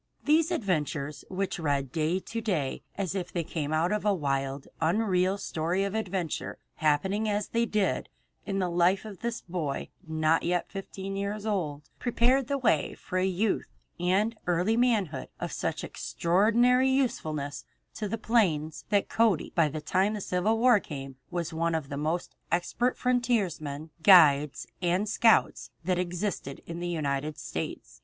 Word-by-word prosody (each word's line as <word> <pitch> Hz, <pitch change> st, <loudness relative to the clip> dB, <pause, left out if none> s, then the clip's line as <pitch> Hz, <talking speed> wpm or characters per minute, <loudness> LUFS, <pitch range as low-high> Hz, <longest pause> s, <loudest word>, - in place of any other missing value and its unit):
These 315 Hz, +2 st, +4 dB
adventures, 150 Hz, -, -1 dB
which 190 Hz, -1 st, -2 dB
read 140 Hz, -4 st, -1 dB
to 180 Hz, +8 st, -1 dB
day 170 Hz, -, -1 dB, 0.2 s
as 190 Hz, -3 st, -1 dB
if 190 Hz, -3 st, -3 dB
they 170 Hz, -, -1 dB
came 155 Hz, -2 st, -3 dB
out 160 Hz, +3 st, +2 dB
of 210 Hz, -1 st, 0 dB
a 205 Hz, -1 st, +3 dB
wild, 135 Hz, -3 st, -2 dB
unreal 185 Hz, +2 st, +2 dB
story 175 Hz, +1 st, -1 dB
of 200 Hz, 0 st, -2 dB
adventure, 190 Hz, -7 st, -3 dB, 0.2 s
happening 190 Hz, +8 st, +1 dB
as 205 Hz, 0 st, -1 dB
they 235 Hz, 0 st, +1 dB
did 210 Hz, -3 st, 0 dB, 0.3 s
in 195 Hz, -1 st, -3 dB
the 185 Hz, -2 st, +1 dB
life 180 Hz, +4 st, +3 dB
of 205 Hz, -4 st, -8 dB
this 235 Hz, 0 st, -3 dB
boy 165 Hz, -6 st, -3 dB, 0.2 s
not 160 Hz, 0 st, +2 dB
yet 175 Hz, 0 st, -1 dB
fifteen 195 Hz, 0 st, -6 dB
years 200 Hz, +1 st, -3 dB
old, 155 Hz, -9 st, -2 dB
prepared 245 Hz, +2 st, +2 dB
the 280 Hz, -, 0 dB
way 215 Hz, -, +1 dB
for 185 Hz, -, -3 dB
a 185 Hz, -, +2 dB
youth 190 Hz, +3 st, 0 dB, 0.3 s
and 195 Hz, +6 st, +2 dB
early 180 Hz, +5 st, +2 dB
manhood 215 Hz, -, +1 dB
of -, -, -3 dB
such -, -, -2 dB
extraordinary 235 Hz, +9 st, +2 dB
usefulness 155 Hz, -, -1 dB, 0.3 s
to 215 Hz, -, -3 dB
the 225 Hz, -, -2 dB
plains 165 Hz, -10 st, +1 dB
that 205 Hz, -1 st, +2 dB
Cody 225 Hz, -7 st, +2 dB
by 165 Hz, -3 st, +4 dB
the 150 Hz, +1 st, -5 dB
time 195 Hz, +6 st, +1 dB
the -, -, -3 dB
Civil 190 Hz, +5 st, +1 dB
War 240 Hz, -2 st, +5 dB
came 135 Hz, -6 st, -8 dB
was 170 Hz, -2 st, -3 dB
one 165 Hz, +1 st, 0 dB
of 150 Hz, -4 st, -3 dB
the 140 Hz, -, -4 dB
most 155 Hz, +4 st, -2 dB, 0.2 s
expert 205 Hz, +8 st, 0 dB
frontiersmen, 195 Hz, -, 0 dB
guides, 150 Hz, -7 st, +6 dB, 0.2 s
and 180 Hz, +4 st, +1 dB
scouts 225 Hz, +1 st, +3 dB, 0.2 s
that 180 Hz, -1 st, +1 dB
existed 180 Hz, -5 st, -3 dB
in 170 Hz, 0 st, -6 dB
the 175 Hz, -, -3 dB
United 150 Hz, -2 st, -2 dB
States. -, -, -6 dB
180 Hz, 160 wpm, -28 LUFS, 155-210 Hz, 0.3 s, guides